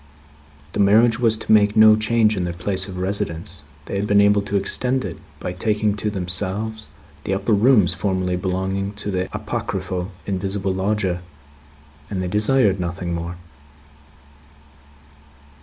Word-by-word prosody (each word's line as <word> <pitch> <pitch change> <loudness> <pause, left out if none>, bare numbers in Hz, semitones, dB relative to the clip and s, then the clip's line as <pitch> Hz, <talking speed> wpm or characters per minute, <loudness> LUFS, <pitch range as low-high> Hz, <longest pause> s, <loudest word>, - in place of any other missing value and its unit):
The - - -3
marriage 110 +4 +4
was 115 -2 +2
to - - -3
make 105 -1 +5
no 110 0 +8
change 110 0 +2
in 95 - -1
their 85 -1 -3
place 95 +2 -2
of 95 -2 -7
residence; 90 -3 -3 0.2
they 100 - -4
had 100 +1 -1
been 100 0 +4
able 100 0 +4
to 100 0 -4
extend 125 +6 0
it, - - -6 0.2
by 90 - -4
taking 105 +2 0
to 105 - -1
themselves 100 +3 -2 0.3
the 95 - -1
upper 110 +3 0
rooms 105 - +4
formerly 90 0 -1
belonging 95 +2 -2
to 105 0 -4
the 95 0 -2
apocryphal 90 +1 -4
invisible 95 0 -2
lodger, 95 -2 -1 0.9
and 100 - -3
they 90 - -2
desired 105 0 +2
nothing 85 0 -3
more. 85 +1 -4
100 Hz, 145 wpm, -21 LUFS, 90-105 Hz, 0.9 s, no